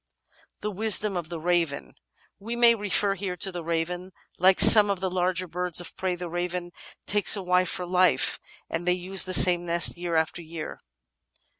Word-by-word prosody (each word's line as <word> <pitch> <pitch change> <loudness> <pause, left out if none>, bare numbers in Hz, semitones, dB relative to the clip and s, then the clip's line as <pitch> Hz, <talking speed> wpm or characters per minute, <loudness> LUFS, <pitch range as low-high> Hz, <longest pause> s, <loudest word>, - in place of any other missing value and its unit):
§6 - - -60 0.6
The 210 - -4
Wisdom 210 0 +1
of 170 -3 -6
the 170 -2 -7
Raven 165 - -2 0.5
We 225 +4 -6
may 235 -1 +4
refer 205 -2 0
here 185 -2 -6
to 190 - -2
the 175 -2 -7
Raven. 175 +3 -4 0.3
Like 185 +1 +3
some 210 -2 +8
of 200 -2 -2
the 190 -1 -4
larger 180 0 -2
birds 180 0 -1
of 175 - -6
prey, 185 -1 -3
the 175 0 -8
Raven 175 +1 -5 0.3
takes 205 +1 +3
a 200 - -6
wife 180 0 0
for 180 - -4
life, 180 0 +1 0.3
and 170 +2 -6
they 180 - +3
use 185 +2 +2
the 185 - -5
same 175 -1 +4
nest 170 0 +2
year 175 -1 -4
after 160 +2 -2
year. 160 -1 -9
180 Hz, 190 wpm, -24 LUFS, 175-190 Hz, 0.6 s, some